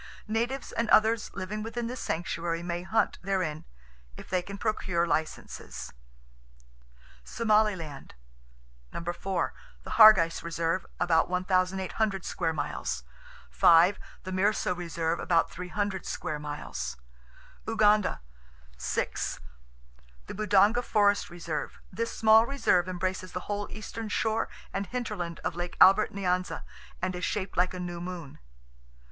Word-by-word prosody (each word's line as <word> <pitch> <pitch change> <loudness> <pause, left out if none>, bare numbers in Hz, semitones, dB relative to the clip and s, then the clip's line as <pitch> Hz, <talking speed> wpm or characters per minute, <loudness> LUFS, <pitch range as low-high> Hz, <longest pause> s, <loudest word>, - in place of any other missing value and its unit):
Natives 235 +5 -2
and 230 -1 -1
others 220 +1 +4
living 210 +3 -4
within 230 +2 -4
this 250 +2 -5
sanctuary 170 0 -2
may 175 0 -3
hunt 205 +5 0
therein—if 60 - -5
they 185 -1 +2
can 200 +3 -8
procure 190 -6 0
licenses. 160 -2 -4 1.3
Somaliland: 200 - 0 0.8
4. 175 +1 -2 0.3
Hargeis 190 -7 +7
Reserve, 170 +1 -1
about 165 -1 +3
1,800 185 +2 0
square 165 -2 -1
miles. 150 - -3 0.5
5. 165 - +6 0.3
Mirso 185 0 +1
Reserve, 170 -1 -2
about 170 -2 +2
300 190 +2 -3
square 155 -4 -3
miles. 145 - -5 0.7
Uganda: 215 - +3 0.6
6. 60 - -2 0.9
Budonga 210 +3 +3
Forest 205 -3 +2
Reserve.—This 175 +6 -5
small 220 +1 +5
reserve 185 -10 +2
embraces 185 0 -3
the 180 - -3
whole 205 +1 -3
eastern 215 +1 -6
shore 220 +1 0 0.2
and 195 0 -2
hinterland 200 -8 -4
of - - -1
Lake 175 +1 -5
Albert 195 +3 +7
Nyanza, 185 -2 -1 0.4
and 185 -1 -1
is 180 - -5
shaped 195 -2 -2
like 180 +1 +1
a - - -5
new 175 -1 -5
moon. 175 -5 -7
185 Hz, 110 wpm, -28 LUFS, 170-210 Hz, 1.3 s, Hargeis